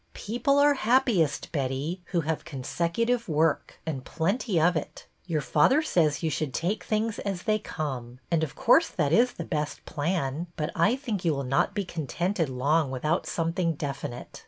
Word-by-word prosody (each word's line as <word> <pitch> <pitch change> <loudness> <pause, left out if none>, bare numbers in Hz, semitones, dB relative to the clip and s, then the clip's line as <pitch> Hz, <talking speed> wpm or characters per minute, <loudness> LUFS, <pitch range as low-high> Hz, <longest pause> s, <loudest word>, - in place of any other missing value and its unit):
People 260 +6 0
are 290 0 +6
happiest, 235 - +2
Betty, 140 +5 -2
who 175 -3 0
have 160 0 -2
con 135 -3 -7
secutive 230 - 0
work, 155 0 +1
and 140 -5 -3
plenty 190 - 0
of 175 +2 +4
it. 155 - -5 0.2
Your 160 -4 0
father 150 - +3
says 160 - +1
you 160 - +1
should 145 -4 -2
take 195 +6 -1
things 220 0 -1
as 195 -3 -3
they 215 -1 +2
come, 130 - -5
and 165 -2 +2
of 155 - -4
course 320 +8 +5
that 150 -3 0
is 245 +5 +4
the - - -5
best 150 -3 -3
plan, 155 0 -2
but 150 -2 -2
I 170 +9 +3
think 235 -9 -4
you 165 -4 +2
will 140 - -2
not 135 +9 +1
be 200 -2 -1
contented 170 +1 -2
long 140 +4 +1
without 150 +6 -1
something 165 0 0
definite. 140 -3 -5
165 Hz, 180 wpm, -27 LUFS, 145-205 Hz, 0.2 s, are